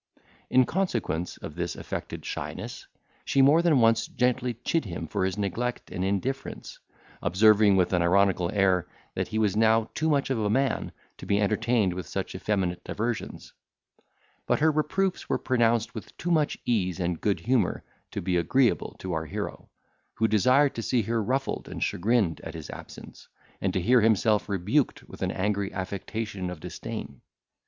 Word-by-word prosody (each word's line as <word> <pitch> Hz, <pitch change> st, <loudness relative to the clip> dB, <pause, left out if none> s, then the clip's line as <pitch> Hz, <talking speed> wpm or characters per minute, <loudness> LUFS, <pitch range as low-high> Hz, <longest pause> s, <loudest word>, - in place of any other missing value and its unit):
In 130 Hz, 0 st, +5 dB
consequence 115 Hz, -, -2 dB
of -, -, -8 dB
this -, -, -3 dB
affected -, -, -6 dB
shyness, -, -, -6 dB, 0.4 s
she 135 Hz, -, +3 dB
more 150 Hz, +5 st, +6 dB
than 165 Hz, -6 st, +4 dB
once 115 Hz, -1 st, +3 dB
gently 125 Hz, -1 st, 0 dB
chid 165 Hz, -5 st, +1 dB
him 85 Hz, -3 st, -5 dB
for 85 Hz, -, -1 dB
his 95 Hz, 0 st, -1 dB
neglect 110 Hz, +5 st, -3 dB
and 90 Hz, -, -3 dB
indifference, 100 Hz, +8 st, -3 dB, 0.4 s
observing, 105 Hz, +2 st, +5 dB
with 95 Hz, 0 st, +2 dB
an 90 Hz, -, +3 dB
ironical 90 Hz, 0 st, +3 dB
air, 95 Hz, -4 st, +2 dB, 0.3 s
that -, -, -2 dB
he 110 Hz, -, -3 dB
was 105 Hz, -3 st, +2 dB
now 110 Hz, 0 st, +3 dB
too 160 Hz, 0 st, 0 dB
much 140 Hz, -2 st, +1 dB
of 125 Hz, -, 0 dB
a 105 Hz, -1 st, 0 dB
man 135 Hz, +5 st, 0 dB, 0.3 s
to -, -, -9 dB
be 100 Hz, 0 st, +2 dB
entertained 110 Hz, -1 st, +1 dB
with 90 Hz, -2 st, -6 dB
such -, -, -4 dB
effeminate 95 Hz, -4 st, -1 dB
diversions; 115 Hz, +1 st, -4 dB, 0.9 s
but -, -, +2 dB
her 160 Hz, +1 st, +4 dB
reproofs 175 Hz, +5 st, -1 dB
were -, -, +2 dB
pronounced 120 Hz, -3 st, +1 dB
with 110 Hz, -, -9 dB
too 175 Hz, -, -2 dB
much 155 Hz, -3 st, +2 dB
ease 95 Hz, -7 st, 0 dB
and 85 Hz, -2 st, -2 dB
good 100 Hz, -2 st, 0 dB
humour 120 Hz, -7 st, +1 dB, 0.3 s
to -, -, -5 dB
be 90 Hz, 0 st, +1 dB
agreeable 120 Hz, +9 st, +2 dB
to 95 Hz, -1 st, -5 dB
our 80 Hz, -1 st, -2 dB
hero, -, -, -5 dB, 0.5 s
who 110 Hz, -, +2 dB
desired 130 Hz, +7 st, +4 dB
to 115 Hz, -, -4 dB
see 120 Hz, 0 st, +1 dB
her 115 Hz, +2 st, 0 dB
ruffled 130 Hz, +5 st, -2 dB
and -, -, -3 dB
chagrined 100 Hz, -3 st, +1 dB
at 80 Hz, 0 st, -7 dB
his 80 Hz, -3 st, -7 dB
absence, -, -, -11 dB, 0.3 s
and 95 Hz, -, +1 dB
to 95 Hz, -, 0 dB
hear 120 Hz, +7 st, +4 dB
himself 110 Hz, -1 st, +3 dB
rebuked 100 Hz, -, 0 dB
with -, -, -12 dB
an -, -, 0 dB
angry 100 Hz, 0 st, -1 dB
affectation 100 Hz, 0 st, -4 dB
of 90 Hz, -3 st, -7 dB
disdain. 70 Hz, -3 st, -7 dB
110 Hz, 170 wpm, -27 LUFS, 95-125 Hz, 0.9 s, more